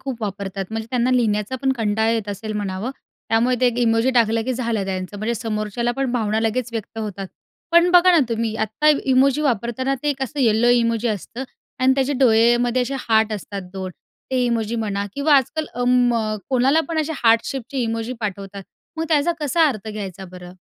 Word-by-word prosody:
खूप 250 -4 -6
वापरतात, 195 -1 -4
म्हणजे 225 0 -4
त्यांना 250 0 +1
लिहिण्याचा 225 -1 +1
पण 265 0 +2
कंटाळा 220 -2 0
येत 225 -3 -1
असेल 215 +2 -5
म्हणावं, 200 +4 -3 0.4
त्यामुळे 235 +3 +2
ते 250 - +4
एक 245 0 0
इमोजी 225 +3 +2
टाकलं 225 -1 +3
की 255 - -1
झालं 230 -5 -2
त्यांचं, 190 +1 -4
म्हणजे 230 +3 -1
समोरच्याला 220 +1 -2
पण 265 -2 0
भावना 220 -2 0
लगेच 225 +2 -1
व्यक्त 225 0 -6
होतात. 200 -3 -5 0.5
पण 340 +1 +5
बघा 360 +1 +6
ना 335 - +5
तुम्ही 225 -1 -1
आत्ता 220 +9 0 0.3
इमोजी 275 +3 +3
वापरताना 250 +1 0
ते 295 - 0
एक 270 -1 -4
असं 280 +2 -3
येलो 230 0 +3
इमोजी 230 0 0
असतं 220 +5 -4 0.4
आणि 260 +1 +4
त्याचे 270 +1 0
डोळेमध्ये 240 +1 +4
असे 260 +3 -3
हार्ट 220 0 +3
असतात 200 -1 -5
2. 190 -1 -5 0.4
ते 255 -1 +1
इमोजी 230 -1 -1
म्हणा, 200 -1 -2
किंवा 285 +1 +3
आज-काल 305 +4 0
अं, 245 0 0 0.2
मग 215 -2 -1
कोणाला 265 +5 +3
पण 330 -1 -2
असे 315 +1 -2
हार्ट 225 0 +6
शेपचे 270 +1 -5
इमोजी 230 +1 -2
पाठवतात, 200 -1 -5 0.3
मग 325 - -1
त्याचा 310 +1 +2
कसा 315 +3 +3
अर्थ 220 -5 -5
घ्यायचा 195 -3 -6
बरं? 180 0 -11
230 Hz, 190 wpm, -21 LUFS, 215-260 Hz, 0.5 s, बघा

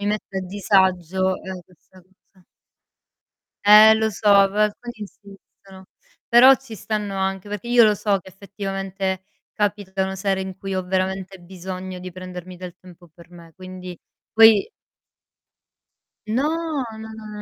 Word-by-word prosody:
mi 200 - -5
mette 210 -2 -3
a 190 - -1
disagio, 190 -1 +1
ehm, 190 -1 -7
questa 185 +1 -22
cosa. 185 0 -30 1.2
Eh 215 +1 +9
lo 220 0 0
so, - - -11 0.3
però 205 +2 -3
alcuni 240 +3 -2
insistono, 195 -2 -14 0.4
però 255 +3 +8
ci 265 -5 -12
stanno 210 0 -4
anche, 195 +1 -3
perché 210 +3 -6
io 240 -1 +6
lo 210 -1 +4
so 200 -1 0
che 190 - -15
effettivamente 195 -1 -5 0.3
capitano 195 -2 -2
sere 190 0 -1
in 190 0 -6
cui 195 0 -5
ho 185 - -1
veramente 190 0 -3
bisogno 185 +1 -8
di 180 0 -9
prendermi 185 0 -9
del 180 0 -9
tempo 175 -1 -17
per 170 +1 -18
me, 170 -2 -15
quindi 185 -2 -10 0.3
poi 225 - +6 1.6
No, 305 +5 -1 0.2
no, 220 0 -9
no, 220 -1 -11
190 Hz, 140 wpm, -22 LUFS, 185-210 Hz, 1.6 s, Eh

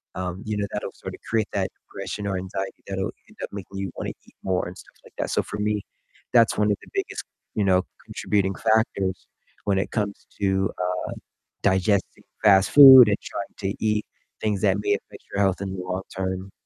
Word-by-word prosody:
um, 90 +1 -4
you 105 -1 -2
know, 100 - 0
that'll - - -3
sorta - - -8
create 110 -2 +1
that - - 0
depression 105 - -7
or 95 -1 -1
anxiety 95 +1 -5
that'll 95 -1 -2 0.2
end - - -20
up - - -5
making 100 -1 -7
you 95 -2 -3
wanna - - -3 0.2
eat - - -22
more 95 -2 0
and 90 - -8
stuff - - -15
like - - -17
that. - - -1
So, - - +1
for 105 - -6
me, 105 -1 0 0.5
that's 115 -2 +5
one 105 0 +3
of 100 - +1
the - - -15
biggest, - - -3 0.3
you 105 - +1
know, 95 -1 +4 0.2
contributing 95 -2 0
factors 110 -4 +1 0.4
when 100 -1 +2
it - - -2
comes 105 -2 -2 0.2
to, 95 -1 +2
uh, 90 0 0 0.7
digesting 95 +1 +1 0.2
fast 95 -2 +6
food 130 -5 +11
and 100 - +2
trying 100 - -6 0.2
to 110 - -5
eat 105 0 +1 0.4
things 105 -3 0
that 100 -1 +3
may 105 0 +1
affect 100 - -6
your 100 - +1
health 95 0 +2
in 95 -1 -3
the 90 - -4
long 90 +1 -3
term. 95 0 -3
100 Hz, 200 wpm, -24 LUFS, 95-105 Hz, 0.7 s, food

